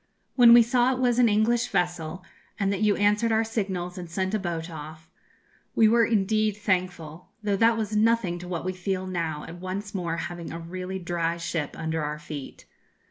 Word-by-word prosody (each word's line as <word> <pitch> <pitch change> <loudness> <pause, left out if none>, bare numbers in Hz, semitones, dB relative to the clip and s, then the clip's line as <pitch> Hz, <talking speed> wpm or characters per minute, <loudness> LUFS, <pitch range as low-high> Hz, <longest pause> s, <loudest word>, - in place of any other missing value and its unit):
'When 240 -2 +8
we 235 0 +9
saw 245 +2 +2
it - - -3
was 245 -1 +2
an 240 -2 +5
English 225 +3 +2
vessel, 175 0 -2 0.3
and 200 -1 +1
that 200 - -3
you 210 -1 +3
answered 210 +3 +2
our 220 0 +3
signals 190 -5 -3
and 175 -2 -7
sent 190 +3 -2
a 215 - +1
boat 170 -3 -3
off, 155 0 -10 0.6
we 220 - +6
were 230 +1 +4
indeed 215 -1 +1
thankful; 180 -5 -2
though 205 -1 +1
that 225 +2 +4
was 215 -1 -2
nothing 215 -5 +2
to 175 - -9
what 175 -1 -4
we 185 - -1
feel 185 0 -3
now 165 -5 -3
at 170 +2 -9
once 190 +3 -5
more 170 -4 -2
having 170 0 -5
a 165 - -5
really 185 +3 -5
dry 170 -2 -2
ship 165 -3 -3
under 160 -1 -2
our 150 +1 -3
feet. 150 -2 -9
185 Hz, 195 wpm, -26 LUFS, 170-215 Hz, 0.6 s, we